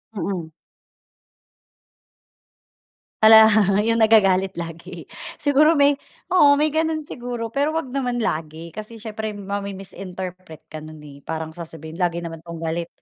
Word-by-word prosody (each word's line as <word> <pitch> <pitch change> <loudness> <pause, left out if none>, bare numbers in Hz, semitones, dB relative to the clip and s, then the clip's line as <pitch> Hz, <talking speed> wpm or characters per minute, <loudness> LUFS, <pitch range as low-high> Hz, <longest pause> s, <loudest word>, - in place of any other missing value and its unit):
Mm. 175 -3 -4 2.7
Hala, 220 0 +9 0.4
yung 230 0 +2
nagagalit 195 -4 +4
lagi. 170 0 -7 0.3
Siguro 300 +2 +4
may 285 0 +5 0.4
oo, 285 -6 +6
may 300 0 +1
gano'n 315 -1 0
siguro, 240 -4 -6
pero 285 +2 +1
wag 315 -5 -3
naman 250 -3 -1
lagi, 160 -5 -3
kasi 215 +2 -8
siyempre 220 0 -5
mami-misinterpret 190 -4 -7
ka 155 0 -9
nun, 155 0 -10
eh. 140 -1 -13
Parang 160 +1 -5
sasabihin, 160 0 -9
"Lagi 175 -1 +1
naman 165 -2 -6
'tong 170 0 -8
galit." 165 +1 -3
195 Hz, 125 wpm, -22 LUFS, 165-240 Hz, 2.7 s, Hala